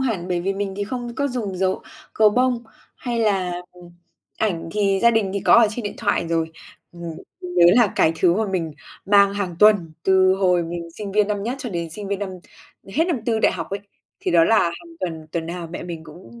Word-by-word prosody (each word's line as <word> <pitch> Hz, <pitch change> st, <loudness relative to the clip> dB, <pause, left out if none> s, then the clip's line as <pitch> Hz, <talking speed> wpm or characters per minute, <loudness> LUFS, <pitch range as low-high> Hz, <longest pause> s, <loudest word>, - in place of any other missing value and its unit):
hẳn, 215 Hz, -9 st, -2 dB
bởi 175 Hz, -1 st, 0 dB
vì 195 Hz, +3 st, -1 dB
mình 195 Hz, -1 st, -3 dB
thì 205 Hz, -, -2 dB
không 240 Hz, +2 st, -5 dB
có 280 Hz, +2 st, 0 dB
dùng 220 Hz, -7 st, -4 dB
dấu 190 Hz, 0 st, 0 dB, 0.3 s
gấu 215 Hz, -1 st, +5 dB
bông, 250 Hz, +1 st, +1 dB, 0.3 s
hay 240 Hz, -2 st, -3 dB
là, 195 Hz, -5 st, +1 dB, 0.2 s
ừm, 175 Hz, -1 st, -15 dB, 0.5 s
ảnh 180 Hz, -7 st, -1 dB
thì 200 Hz, -2 st, +1 dB
gia 235 Hz, -, +7 dB
đình 220 Hz, -4 st, +1 dB
thì 200 Hz, -, -1 dB
có -, -, +5 dB
ở 235 Hz, -1 st, +7 dB
trên 235 Hz, +3 st, -5 dB
điện 205 Hz, -1 st, -4 dB
thoại 170 Hz, -, 0 dB
rồi. 165 Hz, -1 st, 0 dB, 0.4 s
Ừm, 175 Hz, 0 st, -11 dB, 0.4 s
mình 180 Hz, -1 st, -7 dB
nhớ 175 Hz, -1 st, +6 dB
là 235 Hz, -5 st, +4 dB
cái 160 Hz, -, +4 dB
thứ 175 Hz, 0 st, +3 dB
mà 220 Hz, +3 st, 0 dB
mình 175 Hz, -5 st, -2 dB, 0.3 s
mang 200 Hz, 0 st, +5 dB
hàng 190 Hz, -4 st, -3 dB
tuần, 205 Hz, -6 st, +5 dB
từ 190 Hz, 0 st, +4 dB
hồi 180 Hz, -2 st, +2 dB
mình 170 Hz, 0 st, -6 dB
sinh 200 Hz, +3 st, -7 dB
viên 210 Hz, 0 st, +3 dB
năm 205 Hz, -1 st, -1 dB
nhất 235 Hz, +5 st, -2 dB
cho 255 Hz, -, -5 dB
đến 170 Hz, -3 st, -4 dB
sinh 200 Hz, +4 st, -7 dB
viên 200 Hz, -1 st, -1 dB
năm 205 Hz, -1 st, -3 dB, 0.7 s
hết 320 Hz, -, +3 dB
năm 335 Hz, -8 st, -1 dB
tư 225 Hz, -2 st, +1 dB
đại -, -, +3 dB
học 165 Hz, -3 st, -5 dB
ấy, 200 Hz, +1 st, -3 dB, 0.4 s
thì -, -, -1 dB
đó 170 Hz, -1 st, +5 dB
là 225 Hz, +5 st, +4 dB
hàng 330 Hz, -, -3 dB
tuần, 160 Hz, -3 st, -4 dB
tuần 165 Hz, -1 st, -2 dB
nào 170 Hz, 0 st, -5 dB
mẹ 175 Hz, -, -6 dB
mình 170 Hz, -2 st, -7 dB
cũng 150 Hz, -7 st, -13 dB
195 Hz, 235 wpm, -22 LUFS, 175-215 Hz, 0.7 s, gia